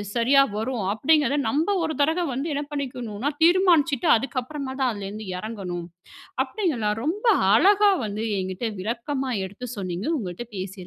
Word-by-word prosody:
சரியா 265 Hz, +4 st, +5 dB
வரும் 225 Hz, -2 st, -2 dB
அப்டீங்குறத 290 Hz, +4 st, +2 dB
நம்ப 310 Hz, +6 st, 0 dB, 0.2 s
ஒரு 315 Hz, -, -3 dB
தடவ 325 Hz, +4 st, +1 dB
வந்து 285 Hz, +5 st, -2 dB
என்ன 290 Hz, +1 st, -2 dB
பண்ணிக்கணும்னா, 250 Hz, -3 st, -3 dB
தீர்மானிச்சுட்டு 335 Hz, -6 st, +4 dB
அதுக்கப்புறமா 265 Hz, +3 st, -4 dB
தான் 255 Hz, -2 st, +2 dB
அதுலேருந்து 205 Hz, +1 st, -7 dB
எறங்கணும். 185 Hz, -5 st, -5 dB, 0.6 s
அப்டீங்களா 265 Hz, -, -1 dB
ரொம்ப 395 Hz, +10 st, -2 dB, 0.3 s
அழகா 400 Hz, -, +5 dB, 0.2 s
வந்து 210 Hz, +1 st, -4 dB, 0.2 s
என்கிட்ட 185 Hz, +4 st, -3 dB
விளக்கமா 255 Hz, +6 st, -3 dB
எடுத்து 205 Hz, +6 st, -7 dB
சொன்னீங்க. 185 Hz, 0 st, -4 dB
உங்கள்ட்ட 190 Hz, 0 st, -5 dB
பேசியதுல 190 Hz, -1 st, -5 dB
255 Hz, 135 wpm, -24 LUFS, 210-295 Hz, 0.6 s, சரியா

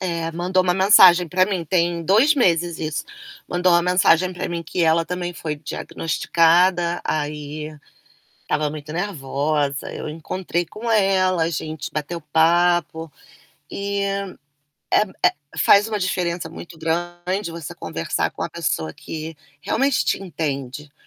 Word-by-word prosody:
eh, 170 Hz, -3 st, -2 dB
mandou 180 Hz, +2 st, +1 dB
uma 180 Hz, -1 st, +2 dB
mensagem 185 Hz, -3 st, +6 dB
para 185 Hz, +3 st, +3 dB
mim, 185 Hz, -4 st, -2 dB
tem 170 Hz, 0 st, 0 dB
2 225 Hz, -, +4 dB
meses 175 Hz, -, +1 dB
isso, 155 Hz, -1 st, -3 dB, 0.4 s
mandou 180 Hz, 0 st, +2 dB
uma 175 Hz, 0 st, +4 dB
mensagem 180 Hz, 0 st, +3 dB
pra 180 Hz, +1 st, -4 dB
mim 170 Hz, -1 st, -3 dB
que 170 Hz, +2 st, -2 dB
ela 165 Hz, 0 st, +3 dB
também 175 Hz, +1 st, -4 dB
foi 155 Hz, -2 st, -4 dB
diagnosticada. 170 Hz, +3 st, +1 dB
Aí 150 Hz, 0 st, -4 dB, 0.7 s
estava 150 Hz, 0 st, -1 dB
muito 150 Hz, 0 st, -8 dB
nervosa, 145 Hz, -5 st, -2 dB
eu -, -, -6 dB
encontrei 170 Hz, +2 st, -3 dB
com 230 Hz, +7 st, -6 dB
ela, 190 Hz, -5 st, +3 dB
a -, -, 0 dB
gente 155 Hz, -1 st, -5 dB
bateu 155 Hz, +3 st, -4 dB
papo 165 Hz, +1 st, +2 dB, 0.6 s
e 200 Hz, 0 st, -3 dB, 0.9 s
é -, -, +5 dB, 0.2 s
é, -, -, +2 dB, 0.3 s
faz 205 Hz, +2 st, +5 dB
uma 215 Hz, -2 st, -2 dB
diferença 175 Hz, -3 st, -2 dB
muito 170 Hz, +1 st, -11 dB
grande 175 Hz, +3 st, -2 dB
você 165 Hz, -3 st, -7 dB
conversar -, -, -2 dB
com -, -, -9 dB
a -, -, -3 dB
pessoa 80 Hz, -1 st, -2 dB
que 160 Hz, 0 st, -7 dB, 0.3 s
realmente 270 Hz, -, +1 dB
te -, -, 0 dB
entende. 150 Hz, -5 st, -5 dB
170 Hz, 140 wpm, -21 LUFS, 155-185 Hz, 0.9 s, mensagem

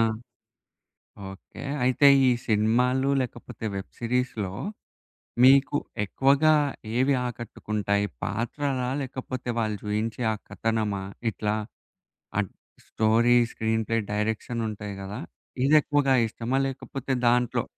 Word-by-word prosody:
ఆ! -, -, +5 dB, 1.3 s
ఓకే. 95 Hz, 0 st, -11 dB, 0.2 s
అయితే 130 Hz, +3 st, +5 dB, 0.2 s
ఈ -, -, +6 dB, 0.2 s
సినిమాలు 125 Hz, +5 st, +2 dB
లేకపోతే 120 Hz, -2 st, -6 dB
వెబ్ 95 Hz, -, -6 dB
సీరీస్‌లో 115 Hz, -5 st, -1 dB, 0.9 s
మీకు 135 Hz, +1 st, +6 dB, 0.3 s
ఎక్కువగా 140 Hz, +8 st, +3 dB, 0.4 s
ఏవి 130 Hz, +2 st, +3 dB
ఆకట్టుకుంటాయి 105 Hz, -3 st, -2 dB, 0.2 s
పాత్రలా? 130 Hz, +1 st, -2 dB
లేకపోతే 130 Hz, -1 st, -6 dB
వాళ్ళు 110 Hz, -2 st, 0 dB
చూయించే 110 Hz, +3 st, -2 dB
ఆ -, -, -1 dB
కథనమా? 110 Hz, -3 st, -1 dB, 0.3 s
ఇట్లా 105 Hz, 0 st, -2 dB, 0.8 s
అడ్ 105 Hz, -3 st, 0 dB, 0.4 s
స్టోరీ, 115 Hz, +2 st, +3 dB, 0.2 s
స్క్రీన్ 110 Hz, 0 st, 0 dB
ప్లే, 115 Hz, 0 st, +1 dB
డైరెక్షన్ 110 Hz, +3 st, -2 dB
ఉంటాయి 105 Hz, -1 st, -6 dB
గదా! 100 Hz, +2 st, -6 dB, 0.4 s
ఇది 145 Hz, +3 st, +4 dB
ఎక్కువగా 145 Hz, -2 st, +2 dB
ఇష్టమా? 115 Hz, +4 st, -2 dB
లేకపోతే 135 Hz, 0 st, -4 dB, 0.2 s
దాంట్లో 125 Hz, 0 st, +2 dB
115 Hz, 105 wpm, -26 LUFS, 105-130 Hz, 1.3 s, ఈ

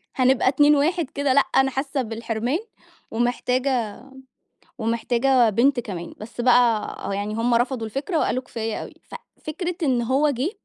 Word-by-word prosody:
هنبقى 260 Hz, 0 st, +3 dB
2 290 Hz, +3 st, +5 dB
1 315 Hz, +1 st, +1 dB
كده، 280 Hz, -1 st, 0 dB
لأ، 280 Hz, -, +6 dB
أنا 270 Hz, 0 st, +1 dB
حاسة 270 Hz, +1 st, -2 dB
بالحرمان 230 Hz, -, -2 dB, 0.5 s
ومحتاجة 245 Hz, -1 st, 0 dB, 0.9 s
ومحتاجة 235 Hz, +2 st, +2 dB
بنت 245 Hz, +5 st, +2 dB
كمان، 180 Hz, -7 st, -7 dB
بس 230 Hz, +3 st, -8 dB
بقى 240 Hz, -3 st, +3 dB, 0.2 s
يعني 205 Hz, +1 st, -3 dB
هم 235 Hz, +1 st, +1 dB
رفضوا 240 Hz, -1 st, 0 dB
الفكرة 285 Hz, -, -2 dB
وقالوا: 255 Hz, -3 st, 0 dB
"كفاية 225 Hz, -3 st, -4 dB
أوي." -, -, -10 dB
ف -, -, -13 dB, 0.3 s
فكرة 350 Hz, +3 st, -4 dB
إن 255 Hz, -5 st, +2 dB
هو 270 Hz, +5 st, +2 dB
جه، 275 Hz, +5 st, -1 dB
250 Hz, 145 wpm, -23 LUFS, 230-275 Hz, 0.9 s, لأ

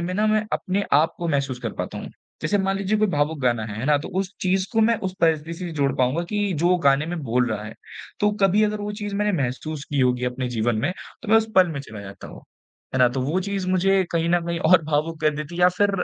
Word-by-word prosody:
में 175 Hz, +2 st, -3 dB
ना 210 Hz, +3 st, +2 dB
मैं 215 Hz, 0 st, +2 dB
अपने 195 Hz, +2 st, -1 dB
आप 155 Hz, +3 st, +4 dB
को 170 Hz, -, -2 dB
महसूस 140 Hz, -4 st, -1 dB
कर -, -, -4 dB
पाता -, -, -4 dB
हूँ। -, -, -7 dB, 0.3 s
जैसे 205 Hz, -, +1 dB
मान 195 Hz, 0 st, 0 dB
लीजिए 200 Hz, +2 st, 0 dB
कोई 215 Hz, -, +3 dB
भावुक 150 Hz, -1 st, 0 dB
गाना 120 Hz, -4 st, +1 dB
है, 105 Hz, -1 st, -6 dB
है 115 Hz, -, -3 dB
ना 150 Hz, 0 st, +4 dB
तो 145 Hz, -, -7 dB
उस 195 Hz, 0 st, -2 dB
चीज़ 185 Hz, 0 st, +1 dB
को 225 Hz, -, +3 dB
मैं 230 Hz, +1 st, +4 dB
उस 185 Hz, -, -10 dB
परिस्थिति 160 Hz, 0 st, +1 dB
से 180 Hz, -2 st, -5 dB
जोड़ 140 Hz, -2 st, +1 dB
पाऊँगा 130 Hz, +7 st, +1 dB
कि 205 Hz, +1 st, -1 dB
जो 175 Hz, +2 st, +3 dB
गाने 140 Hz, +3 st, +4 dB
में 175 Hz, 0 st, -3 dB
बोल 125 Hz, 0 st, +1 dB
रहा 105 Hz, -1 st, -3 dB
है, 110 Hz, -, -8 dB, 0.5 s
तो 210 Hz, -, +3 dB
कभी 195 Hz, +2 st, +4 dB
अगर 210 Hz, 0 st, -1 dB
वो 205 Hz, 0 st, -4 dB
चीज़ 205 Hz, -1 st, -4 dB
मैंने 210 Hz, 0 st, +1 dB
महसूस 140 Hz, +4 st, -4 dB
की 145 Hz, -2 st, +1 dB
होगी 125 Hz, -1 st, +2 dB
अपने 125 Hz, 0 st, -2 dB
जीवन 115 Hz, -1 st, 0 dB
में 145 Hz, +9 st, 0 dB, 0.3 s
तो 225 Hz, -, -9 dB
मैं 220 Hz, -, +6 dB
उसे 220 Hz, 0 st, +1 dB
पल 185 Hz, -1 st, +6 dB
में 140 Hz, -, -4 dB
चला 110 Hz, -6 st, -9 dB
जाता 100 Hz, 0 st, -10 dB
हूँ। -, -, -12 dB, 0.5 s
है -, -, +1 dB
ना? 125 Hz, -1 st, +6 dB
तो 130 Hz, +2 st, -3 dB
वो 155 Hz, +8 st, 0 dB
चीज़ 195 Hz, 0 st, -3 dB
मुझे 190 Hz, +1 st, +3 dB
कहीं 165 Hz, 0 st, +1 dB
न 175 Hz, 0 st, +3 dB
कहीं 170 Hz, 0 st, -2 dB
और 165 Hz, +1 st, +5 dB
भावुक 155 Hz, +1 st, -1 dB
कर 155 Hz, -, +3 dB
देती 150 Hz, +2 st, -6 dB
है 180 Hz, -, -4 dB
या 180 Hz, -, +7 dB
फिर 205 Hz, 0 st, +4 dB
165 Hz, 270 wpm, -23 LUFS, 135-195 Hz, 0.5 s, या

